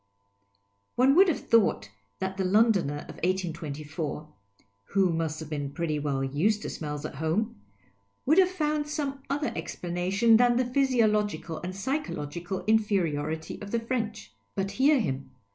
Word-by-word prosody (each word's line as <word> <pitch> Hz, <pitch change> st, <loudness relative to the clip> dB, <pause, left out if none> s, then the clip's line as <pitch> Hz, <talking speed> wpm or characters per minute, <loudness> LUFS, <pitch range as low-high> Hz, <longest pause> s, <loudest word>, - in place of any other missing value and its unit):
One 260 Hz, +2 st, +5 dB
would 380 Hz, +5 st, +7 dB
have 335 Hz, -, 0 dB
thought 105 Hz, -, +3 dB, 0.3 s
that 190 Hz, 0 st, -3 dB
the 190 Hz, -, 0 dB
Londoner 190 Hz, -7 st, +3 dB
of -, -, -10 dB
1824. 155 Hz, -4 st, -3 dB, 0.5 s
(who 190 Hz, -3 st, +2 dB
must 160 Hz, -1 st, -2 dB
have 160 Hz, -2 st, -7 dB
been 145 Hz, -2 st, -2 dB
pretty 160 Hz, -3 st, -1 dB
well 140 Hz, -2 st, -1 dB
\ised 180 Hz, +11 st, +1 dB
to -, -, -4 dB
smells 150 Hz, -1 st, -5 dB
at -, -, -5 dB
home) 160 Hz, -, -1 dB, 0.6 s
would 310 Hz, +7 st, +5 dB
have 370 Hz, -1 st, +5 dB
fomid 305 Hz, -4 st, -1 dB
some 285 Hz, -2 st, -3 dB
other 290 Hz, +2 st, -1 dB
explanation 180 Hz, +7 st, +2 dB
than 245 Hz, 0 st, +4 dB
the 255 Hz, -, +2 dB
physiological 220 Hz, -, +1 dB
and 185 Hz, +1 st, -6 dB
psychological 190 Hz, -, -3 dB
inferiority 165 Hz, -8 st, 0 dB
of 205 Hz, -, -7 dB
the 235 Hz, -, 0 dB
French. 225 Hz, -, -3 dB, 0.2 s
But 195 Hz, 0 st, -1 dB
hear 275 Hz, +7 st, +4 dB
him. 135 Hz, -, -2 dB
190 Hz, 145 wpm, -28 LUFS, 155-240 Hz, 0.6 s, would